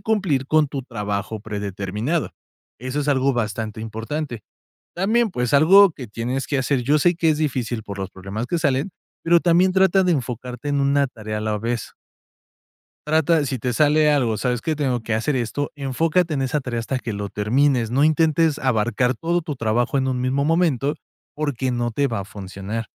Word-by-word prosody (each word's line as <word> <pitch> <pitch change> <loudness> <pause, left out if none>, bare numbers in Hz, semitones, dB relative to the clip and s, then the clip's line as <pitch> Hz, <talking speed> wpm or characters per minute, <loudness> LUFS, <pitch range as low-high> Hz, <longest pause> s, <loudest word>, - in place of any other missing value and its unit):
cumplir 185 -12 0
con 155 0 +3
tu 135 -2 -4
trabajo 105 -2 -4
predeterminado. 105 - -3 0.5
Eso 130 +4 -3
es 145 - -3
algo 135 -1 +2
bastante 110 -1 -3
importante. 115 +2 -5 0.5
También, 220 +5 +2
pues, 125 -1 -2
algo 185 +6 +7
que 130 -6 -9
tienes 120 +5 -3
que 140 - -1
hacer 130 0 0
yo 145 +5 +2
sé 175 +3 +3
que 165 -1 +2
es 150 - +2
difícil 125 -6 -2
por 100 -2 -7
los 95 -1 -4
problemas 100 +5 -5
que 170 +5 -1
salen, 140 +4 0 0.3
pero 170 0 +5
también 180 +2 +3
trata 190 0 +4
de 180 - +2
enfocarte 125 -1 -3
en 140 0 +1
una 140 0 +2
tarea 110 -3 -6
a - - -5
la 110 -1 -1
vez. 115 +1 -3 1.1
Trata, 160 +1 +3
de 145 - 0
si 130 - -2
te 125 +1 -2
sale 150 +2 +4
algo: 120 -7 +1
"¿Sabes 125 -2 -1
qué?, 160 - -1
tengo 130 -5 0
que 110 -1 -2
hacer 130 +5 0
esto", 130 +4 -2
enfócate 155 +4 0
en 135 - 0
esa 140 +3 0
tarea 125 -3 -3
hasta 130 +3 -3
que 115 - -5
lo 100 0 -4
termines. 120 +2 +1
No 135 +4 +2
intentes 155 0 +3
abarcar 125 0 +1
todo 170 +1 -1
tu 155 -4 -5
trabajo 120 +4 0
en 130 0 0
un 125 -1 -1
mismo 135 +3 0
momento, 155 -4 +1 0.4
porque 135 -4 -2
no 120 -1 -1
te 140 +5 0
va 110 -4 -3
a 95 - -5
funcionar. 100 +2 -6
130 Hz, 195 wpm, -22 LUFS, 115-150 Hz, 1.1 s, algo